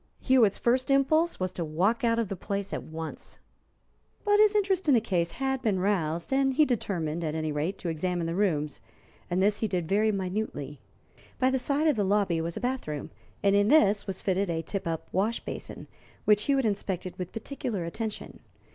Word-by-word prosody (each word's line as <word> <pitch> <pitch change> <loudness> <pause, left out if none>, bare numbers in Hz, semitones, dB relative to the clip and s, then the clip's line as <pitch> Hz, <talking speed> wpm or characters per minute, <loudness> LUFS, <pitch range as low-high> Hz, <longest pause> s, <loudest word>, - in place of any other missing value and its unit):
Hewitt's 240 -7 +4
first 255 +3 +1
impulse 310 +5 +3
was 185 -1 -1
to 180 - -4
walk 185 - 0
out 230 -1 +3
of 230 -2 0
the 195 - -4
place 200 +1 -4
at - - -2
once. 160 0 -7 0.9
But 415 0 +4
his 425 0 +5
interest 385 -4 +1
in 280 - +6
the - - +5
case 175 -6 -1
had 265 -1 -1
been 215 -6 +1
roused, 170 -1 0
and 270 -1 +2
he 305 - +5
determined, 170 - -2
at 155 -1 -2
any 155 -1 -1
rate, 155 +6 -2
to - - -6
examine 170 +1 -1
the 165 - -2
rooms, 155 -7 0 0.5
and 180 +2 +1
this 205 +1 +2
he 220 - 0
did 180 -5 -2
very 210 +4 +2
minutely. 185 -8 -3 0.6
By 255 +1 +2
the 265 - +1
side 280 +4 +1
of 295 -6 +3
the 205 - +2
lobby 195 -4 +1
was 165 +1 -4
a - - -2
bath 255 -3 -2
room, 150 -2 -5 0.3
and 200 0 +4
in 205 0 +4
this 215 -8 +4
was 195 - -4
fitted 195 0 0
a 165 -1 -1
tip 195 -1 -4
up 165 -1 -3
wash 210 +5 0
basin, - - -7 0.4
which 210 0 +4
Hewitt 275 -3 +2
inspected 190 -3 -2
with 180 -1 -4
particular 225 -4 -4
attention. 215 +6 -5
200 Hz, 200 wpm, -28 LUFS, 170-245 Hz, 0.9 s, in